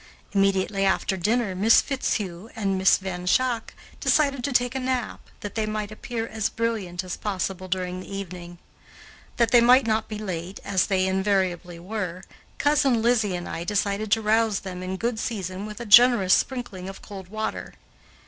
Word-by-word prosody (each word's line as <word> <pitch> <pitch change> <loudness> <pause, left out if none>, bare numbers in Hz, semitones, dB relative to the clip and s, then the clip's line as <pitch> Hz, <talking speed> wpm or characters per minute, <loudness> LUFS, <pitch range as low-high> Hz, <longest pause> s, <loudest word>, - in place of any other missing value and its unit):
Immediately 195 0 +1
after 190 0 +1
dinner, 210 +2 0
Miss 210 +5 +5
Fitzhugh 210 -8 -2
and 200 -3 -1
Miss 190 0 +4
Van 180 -2 -6
Schaack 240 +3 +1 0.2
decided 280 -4 +2
to 280 - -1
take 245 -1 +2
a 265 - -2
nap, 255 -3 -3
that 205 - -6
they 220 -1 -1
might 215 -1 -3
appear 225 +1 -4
as 220 -2 -2
brilliant 210 -6 -2
as 180 -1 -5
possible 190 -2 -3
during 185 0 -2
the 185 - -10
evening. 180 -3 -7 0.8
That 235 -1 +2
they 240 -1 +7
might 250 +2 +6
not 220 0 0
be 215 - -5
late, 185 -3 -5
as 195 -2 +1
they 190 -2 +1
invariably 190 -2 0
were, 185 -1 -5 0.3
Cousin 275 -5 +2
Lizzie 225 -5 +2
and 175 0 -5
I 165 - -4
decided 205 +2 -1
to 225 - +1
rouse 220 -1 +2
them 185 -2 -7
in 185 +1 -4
good 230 +2 -2
season 195 -3 -4
with 210 -1 -8
a 235 - -5
generous 215 -3 +7
sprinkling 215 -8 -1
of 195 - -10
cold 195 -3 -9
water. 215 +3 -5
205 Hz, 175 wpm, -25 LUFS, 185-230 Hz, 0.8 s, they